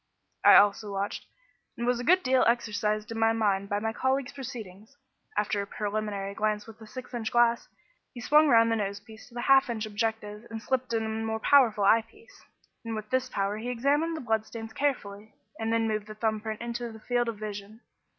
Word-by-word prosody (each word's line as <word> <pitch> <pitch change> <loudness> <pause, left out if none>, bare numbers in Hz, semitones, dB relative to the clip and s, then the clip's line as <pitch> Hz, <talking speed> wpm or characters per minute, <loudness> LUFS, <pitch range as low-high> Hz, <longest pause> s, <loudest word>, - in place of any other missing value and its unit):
I - - +9
also 205 +1 +4
watched, 200 +1 -4 0.5
and 235 - -2
was 245 0 +1
a - - -4
good 365 +7 +4
deal 260 0 +3
exercised 215 -1 0
in 225 - -4
my 225 0 +4
mind 200 -3 0
by 205 - 0
my 225 +1 -2
colleague's 260 +2 0
proceedings. 225 -3 -9 0.4
After 210 0 0
a 200 - -6
preliminary 205 -1 -3
glance 210 0 -1
with 225 0 -13
the 220 - -12
six 255 +3 -9
inch 230 -2 -3
glass, 235 0 +3 0.4
he 245 - -10
swung 300 +5 +5
round 230 -3 +5
the 225 - +2
nose 200 -1 -3
piece 220 +2 -14
to 240 - -18
the 240 - -3
half 270 0 +5
inch 225 -2 -2
objective 215 0 -3
and 225 -1 -5
slipped 255 +2 -2
in 225 -1 0
a - - -3
more 220 0 -2
powerful 225 -5 +4
eye 220 +3 +5
piece, 430 - -21 0.4
and 230 -1 -4
with 215 -1 -7
this 260 0 0
power 200 -1 -1
he 230 +3 -5
examined 290 +7 +1
the - - -6
blood 220 -3 0
stains 225 -1 -8
carefully, 220 -7 -3 0.2
and 225 0 -1
then 225 0 +1
moved 215 -1 -2
the 215 - -9
thumb 215 -1 -1
print 220 0 -5
into 235 0 -4
the 220 - -11
field 240 +1 0
of 225 - -5
vision. 210 +1 -7
225 Hz, 215 wpm, -28 LUFS, 210-240 Hz, 0.5 s, I